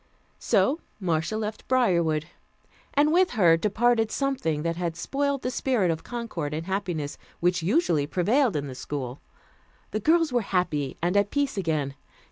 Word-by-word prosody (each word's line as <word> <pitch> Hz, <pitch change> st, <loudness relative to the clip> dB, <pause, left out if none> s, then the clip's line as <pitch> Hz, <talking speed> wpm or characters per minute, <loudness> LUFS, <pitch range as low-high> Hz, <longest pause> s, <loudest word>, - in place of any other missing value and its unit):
So 295 Hz, +5 st, +2 dB, 0.2 s
Marcia 170 Hz, +2 st, -1 dB
left 215 Hz, 0 st, -5 dB
Briarwood, 170 Hz, -, +2 dB, 0.7 s
and 295 Hz, +2 st, +4 dB
with 365 Hz, +1 st, +4 dB
her 170 Hz, -5 st, +6 dB
departed 225 Hz, +5 st, +2 dB
something 215 Hz, -, -1 dB
that 170 Hz, 0 st, -1 dB
had 170 Hz, -1 st, -2 dB
spoiled 280 Hz, +9 st, -1 dB
the 250 Hz, -, -1 dB
spirit 245 Hz, -10 st, +1 dB
of 160 Hz, -, -4 dB
concord 200 Hz, -12 st, -4 dB
and 160 Hz, +1 st, -4 dB
happiness 180 Hz, -6 st, -3 dB, 0.2 s
which 175 Hz, 0 st, +1 dB
usually 170 Hz, -, +2 dB
prevailed 215 Hz, -, +2 dB
in 145 Hz, -1 st, -1 dB
the 135 Hz, -, -6 dB
school. 130 Hz, -1 st, -5 dB, 0.7 s
The 215 Hz, -, -1 dB
girls 320 Hz, +4 st, +3 dB
were 245 Hz, -, +3 dB
happy 170 Hz, -9 st, -1 dB
and 175 Hz, +3 st, +1 dB
at 200 Hz, 0 st, +3 dB
peace 285 Hz, -1 st, 0 dB
again. 155 Hz, -7 st, -1 dB
190 Hz, 155 wpm, -26 LUFS, 160-245 Hz, 0.7 s, her